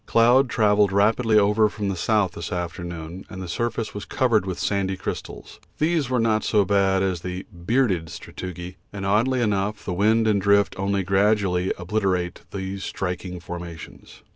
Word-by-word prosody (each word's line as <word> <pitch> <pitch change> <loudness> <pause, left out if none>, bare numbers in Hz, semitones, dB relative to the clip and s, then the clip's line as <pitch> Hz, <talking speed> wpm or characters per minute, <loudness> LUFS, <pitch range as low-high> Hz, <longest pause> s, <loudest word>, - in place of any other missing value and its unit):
Cloud 120 +3 +4
travelled 105 -3 +3
rapidly 110 +3 +3
over 105 +1 +4
from 105 -1 -4
the 95 - -2
south 100 +1 +1
this 85 +1 -7
afternoon, 85 0 -5
and 95 - -8
the 95 - -6
surface 115 +4 -2
was 105 - -6
covered 110 -6 +1
with 95 - -3
sandy 95 -2 -1
crystals; - - -7 0.2
these 155 -4 +1
were 130 -1 +1
not 110 -1 +2
so 105 -2 +2
bad 95 0 +2
as 90 -3 -1
the 90 +1 -5
'bearded' 90 -2 0
sastrugi, 90 +3 -8
and 100 -1 -5
oddly 120 +6 +2
enough 105 0 -1
the 90 - -2
wind 110 +4 +3
and 105 -2 +2
drift 100 0 +3
only 100 0 0
gradually 95 -1 +2
obliterate 90 -2 -1
these 95 0 -5
striking 90 -1 -4
formations. 85 -1 -9
100 Hz, 165 wpm, -24 LUFS, 90-110 Hz, 0.2 s, Cloud